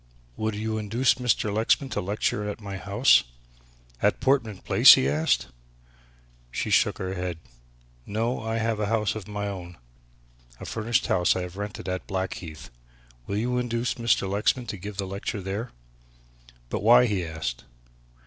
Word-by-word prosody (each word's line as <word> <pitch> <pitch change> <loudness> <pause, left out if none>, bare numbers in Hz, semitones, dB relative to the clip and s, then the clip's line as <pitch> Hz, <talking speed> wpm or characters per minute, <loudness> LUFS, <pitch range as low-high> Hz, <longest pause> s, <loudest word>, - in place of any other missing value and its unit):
Would 110 +5 -2
you 110 +1 -2
induce 115 +5 +2
Mr. 110 -4 +1
Lexman 115 +5 +1
to - - -1
lecture 105 +1 -1
at 105 - -6
my 100 -2 -6
house?" 100 +7 +4 0.8
"At - - +2
Portman 125 -7 +1
Place!" - - +8
he 65 - +1
asked. 75 0 +1 1.0
She - - -3
shook - - +3
her 95 0 -4
head. 90 -2 -3 0.7
"No, 115 +4 -1
I 110 0 -2
have 115 -1 -1
a 105 - 0
house 105 -2 +1
of 110 -4 -7
my 105 0 -4
own. 90 -3 -7 0.8
A - - -8
furnished 115 +1 0
house 90 -1 +2
I 95 - -1
have 90 0 -8
rented 105 0 -6
at 90 0 -3
Blackheath. 95 -6 -5 0.6
Will 100 - -2
you 125 +3 0
induce 120 0 -1
Mr. 115 -4 +1
Lexman 105 +5 0
to 105 - -5
give 100 +2 -8
the 100 - -2
lecture 100 +2 -4
there?" 100 +5 -4 1.0
"But - - -2
why?" 120 +3 +7
he 100 -6 -1
asked. 80 -6 -5
105 Hz, 160 wpm, -26 LUFS, 95-115 Hz, 1.0 s, Place